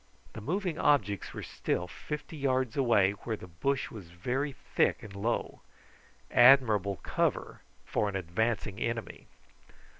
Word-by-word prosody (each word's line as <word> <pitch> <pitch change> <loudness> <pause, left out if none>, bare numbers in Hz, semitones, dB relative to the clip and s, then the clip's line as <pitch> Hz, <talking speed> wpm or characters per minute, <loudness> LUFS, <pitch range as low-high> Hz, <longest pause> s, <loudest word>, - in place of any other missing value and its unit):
The 115 - -7
moving 175 - -2
objects 105 -10 +2
were - - -7
still 90 - -2
fifty 150 - -7
yards 130 -4 0
away, 115 -8 +4
where 110 +2 -5
the - - -10
bush 110 +11 -2
was 100 -7 -10
very 125 +12 -2 0.2
thick - - +2
and 100 -2 -10
low. 110 +4 -2 0.7
Admirable 115 -6 +6
cover - - -1 0.2
for 105 - 0
an 100 - -6
advancing 100 +3 -1
enemy. 115 -6 -4
115 Hz, 130 wpm, -30 LUFS, 100-135 Hz, 0.7 s, Admirable